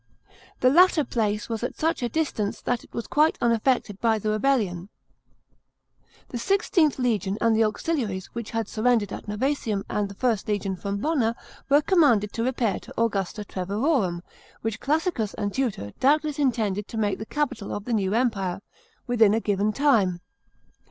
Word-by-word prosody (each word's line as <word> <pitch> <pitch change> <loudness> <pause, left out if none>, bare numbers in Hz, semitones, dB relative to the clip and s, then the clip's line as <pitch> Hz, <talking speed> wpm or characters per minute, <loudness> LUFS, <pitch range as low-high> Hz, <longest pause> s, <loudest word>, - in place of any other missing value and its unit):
The 255 - +5
latter 350 0 +5
place 210 -5 -1
was 225 -2 -3
at 245 - -4
such 320 -2 0
a 240 - -1
distance 255 -10 -1
that 245 -1 -1
it - - -19
was 235 - -4
quite 305 +2 +2
unaffected 230 -3 +1
by 225 -2 +3
the 215 0 -1
rebellion. 215 -6 0 1.4
The 240 - -4
XVIth 350 - +2
legion 215 -6 0
and 230 -1 +3
the 225 - +4
auxiliaries 215 - -2
which 235 -2 -5
had 225 -2 -2
surrendered 220 -3 +1
at - - -8
Novsesium 215 -2 -1
and 205 -1 -1
the 200 - -10
1st 230 -2 0
legion 200 -2 -1
from 200 +2 -4
Bonna 235 -2 0 0.3
were 290 +2 +5
commanded 265 - +3
to 230 - -2
repair 240 -5 0
to - - -10
Augusta 210 -2 -1
Treverorum 195 - -1 0.2
— - - -27
which 225 -1 -2
Classicus 300 - -1
and 205 -2 -3
Tutor 225 - -2
doubt 295 +4 +4
less 300 -1 -4
intended 215 -7 0
to 225 - -7
make 205 -2 0
the 220 - -5
capital 265 -8 -2
of 205 - -5
the 245 - -2
new 200 -1 +1
empire 200 -7 0 0.2
— - - -37
within 225 -4 +4
a - - +2
given 205 -1 0
time. 215 -10 +2
225 Hz, 175 wpm, -25 LUFS, 205-265 Hz, 1.4 s, The